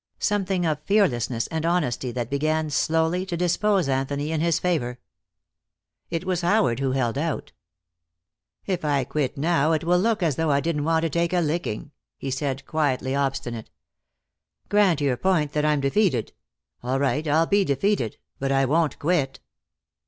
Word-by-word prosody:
Something 195 -3 0
of 155 -2 0
fearlessness 125 - +1
and 160 -1 -2
honesty 150 -8 0
that 120 0 -4
began, 155 +2 0
slowly, 160 +4 +1
to 175 - -3
dispose 180 +1 +1
Anthony 140 +3 -1
in 160 -1 0
his 165 -1 +2
favor. 125 -9 -1 1.1
It 165 +2 -3
was 180 -2 0
Howard 175 - +2
who 135 -1 0
held 130 0 0
out. 150 -2 -3 1.1
"If 180 -3 -2
I 145 -3 +1
quit 140 +1 -2
now 160 +1 +2
it 155 - 0
will 175 +1 +3
look 220 0 +1
as 155 -6 +1
though 160 -1 +1
I 140 -1 +3
didn't 150 -1 -1
want 160 0 +2
to 165 - +1
take 170 +2 0
a 180 - +3
licking," 155 -6 -2 0.3
he 135 - -4
said, 135 0 -3
quietly 135 -4 0
obstinate. 135 -5 -2 1.0
"Grant 195 -7 +3
your 135 -3 +1
point, 155 -2 +1
that 150 0 0
I'm 150 -2 +2
defeated. 140 - +1 0.5
All 130 +2 -1
right, 145 +3 0
I'll 160 +3 +3
be 200 +3 +3
defeated 140 - 0 0.2
but 135 0 -1
I 135 0 +3
won't 155 +3 +1
quit." 150 -4 0
155 Hz, 165 wpm, -24 LUFS, 135-175 Hz, 1.1 s, will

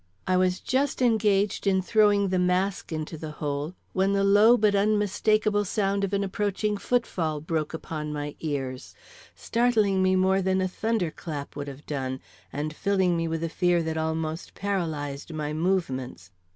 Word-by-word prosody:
I 185 - +2
was 185 0 +2
just 270 +2 0
engaged 210 -5 +2
in 190 -1 +3
throwing 205 0 +3
the 185 0 +1
mask 180 +1 0
into 155 0 -4
the 155 -1 -6
hole, 145 +3 -3 0.2
when 195 +1 +2
the 200 0 +2
low 205 +4 +6
but 210 -2 +3
unmistakable 210 +1 +2
sound 200 0 0
of 195 - -1
an 200 0 0
approaching 205 +2 -1
foot 240 +4 0
fall 155 -4 -2
broke 155 0 -2
upon 155 -1 -5
my 145 -1 -4
ears, 135 -4 -4 0.4
startling 220 -5 +2
me 185 0 +3
more 190 +1 +3
than 190 0 +1
a 185 - +1
thunder 210 -2 -1
clap 150 -3 -7
would 145 0 -5
have 140 +1 -9
done, 130 -3 -3 0.3
and 150 +2 -4
filling 190 -2 +1
me 165 0 -1
with 165 0 -2
a - - 0
fear 175 +1 +1
that 160 0 -2
almost 160 0 -3
paralyzed 160 -7 -3
my 150 -1 -3
movements. 135 - -2
185 Hz, 170 wpm, -26 LUFS, 155-200 Hz, 0.4 s, low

